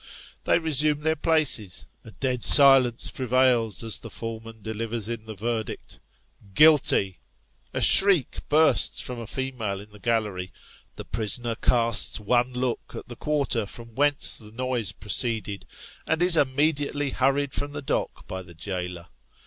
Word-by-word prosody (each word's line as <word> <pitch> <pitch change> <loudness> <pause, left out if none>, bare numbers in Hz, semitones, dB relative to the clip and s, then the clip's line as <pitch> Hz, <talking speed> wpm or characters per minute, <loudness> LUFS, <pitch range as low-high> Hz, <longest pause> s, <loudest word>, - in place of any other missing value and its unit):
They - - +2
resume 150 -2 +2
their 160 +1 0
places 150 - 0 0.2
a - - -14
dead 125 +4 -4
silence 135 -4 +8
prevails 125 -4 0
as 110 -2 +1
the 115 - -10
foreman 115 -1 -9
delivers 110 0 -4
in 115 -1 -7
the 110 - -9
verdict 110 +1 -6 0.3
" 100 -2 -27
Guilty! 145 - +3 0.3
" - - -38
A - - -2
shriek 195 -8 +6
bursts 155 +2 +2
from 125 -1 -5
a 115 - -9
female 125 -6 -5
in 105 +1 -14
the 105 - -16
gallery; 105 -5 -3 0.4
the - - -9
prisoner 115 +3 -1
casts 115 -1 0
one 120 +4 -1
look 125 -1 -5
at - - -10
the 120 - -9
quarter 140 -7 -3
from 115 +2 -11
whence 145 +3 -1
the 105 -1 -12
noise 125 -4 -3
proceeded; 105 0 -3 0.4
and 160 +2 -1
is 180 -1 +4
immediately 145 0 -1
hurried 135 +2 -1
from 145 0 -5
the 145 -1 -7
dock - - -4
by 95 0 -7
the 85 -2 -16
jailer. 90 0 -7
120 Hz, 155 wpm, -24 LUFS, 110-140 Hz, 0.4 s, silence